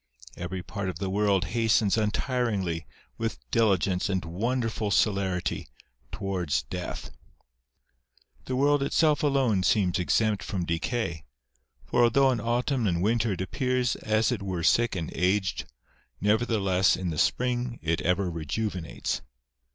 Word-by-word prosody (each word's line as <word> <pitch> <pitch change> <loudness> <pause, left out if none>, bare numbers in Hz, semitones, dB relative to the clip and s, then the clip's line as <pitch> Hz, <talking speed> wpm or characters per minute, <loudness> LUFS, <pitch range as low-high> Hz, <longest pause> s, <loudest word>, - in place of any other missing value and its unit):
Every 90 +1 -5
part 95 +2 -4
of 90 - -5
the 95 +1 -3
world 100 -2 +2
hastens 110 -3 +3
untiringly, 105 - -1 0.3
with 115 0 -2
diligence 100 -4 +2
and 95 -3 -1
wonderful 110 +4 -1
celerity, 95 -4 0 0.4
towards 90 -10 -1
death. 90 -2 -6 1.3
^ - - -31
The 130 - -2
world 145 +2 +3
itself 150 +2 +2
alone 135 -9 +2
seems 90 0 +2
exempt 105 +3 +1
from 95 -5 -3
decay; 85 -1 -2 0.6
for 120 - +1
although 130 +3 +5
in 125 - -1
autumn 120 +1 0
and 85 -1 0
winter 115 0 +2
it 95 - -5
appears 125 +5 0
as 110 +1 +1
it 115 -4 -2
were 95 -4 -3
sick 120 +2 +3
and 85 -4 -4
aged, 95 +2 0 0.5
nevertheless 105 -3 +2
in 90 -2 -2
the 75 - -3
spring 125 -1 0
it 80 +1 0
ever 90 +1 +1
rejuvenates. 85 +1 -3
100 Hz, 135 wpm, -27 LUFS, 90-120 Hz, 1.3 s, although